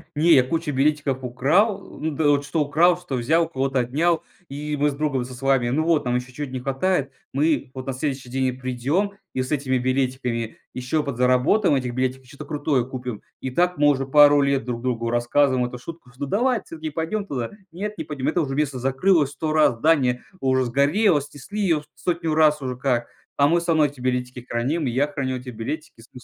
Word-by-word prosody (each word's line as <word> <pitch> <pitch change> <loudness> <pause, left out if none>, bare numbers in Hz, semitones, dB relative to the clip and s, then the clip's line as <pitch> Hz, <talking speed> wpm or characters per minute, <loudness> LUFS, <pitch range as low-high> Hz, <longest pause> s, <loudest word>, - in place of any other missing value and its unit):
Не, 165 +3 +5
я 130 - +6
кучу 160 +3 -2
билетиков 140 -1 +1
украл. 165 - +2 0.2
Ну, 150 -1 +2
эт 140 - -6
что 150 +2 -1
украл, 165 +5 +3
что 140 - -5
взял, 160 +8 +2
у - - -12
кого-то 135 -3 -1
отнял, 155 +8 +1 0.3
и 150 +2 -4
мы 145 +1 +2
с - - -4
друг 150 -1 -1
со 130 - -9
с 125 - -11
вами. 135 -3 +2
Ну 145 +6 +1
вот, 165 -2 +2
нам 125 - 0
еще 125 +1 -7
чё-то 145 -1 -5
не 130 - -3
хватает. 135 +3 -1 0.2
Мы 145 -1 +1
вот 130 0 -7
на 135 - -1
следующий 135 -1 -3
день 130 +1 -1
и - - +1
придем 130 +10 -1 0.2
и 130 - -1
с 130 - -5
этими 130 -2 0
билетиками 125 -3 -1 0.2
еще 130 +5 -1
подзаработаем 130 - +2
этих 125 -2 -2
билетиков, 130 +1 -2
чё-то 140 +3 -10
крутое 145 -4 0
купим. 125 -4 -6 0.2
И 130 - -3
так 180 +6 +1
мы 145 0 +4
уже 135 -2 +2
пару 145 +1 +6
лет 140 -1 +1
друг 120 -2 -4
другу 115 -2 -1
рассказываем 125 +2 +2
эту 125 - -8
шутку, 125 0 -10
что: 140 +3 -5
"Давай 240 - +1
вот 210 - -9
всё-таки 160 -1 -6
пойдем 165 +7 -3
туда". 125 -10 -4 0.2
"Нет, 210 +5 -5
не - - -3
пойдем, 145 -3 -4
это 165 +3 +1
уже 135 -3 -2
место 145 -3 0
закрылось 140 +3 +2
100 155 +2 -3
раз, 150 -6 +4
здание 130 -3 +2 0.2
уже 130 -1 +2
сгорело, 145 - +3
снесли 145 +9 -7
ее 165 -6 +1
100 170 -3 -1
раз 150 -1 +4
уже 130 -2 -3
как, 125 -2 0 0.3
а 140 - +5
мы 170 +3 +2
всё 170 - -7
равно 160 -2 +4
эти 145 -3 -5
билетики 125 -1 -2
храним, 140 +7 -1
и - - 0
я 135 +5 +1
храню 135 -3 -3
эти 125 +1 -11
билетики 120 +3 -6
с". 115 - -18
140 Hz, 215 wpm, -23 LUFS, 125-155 Hz, 0.3 s, я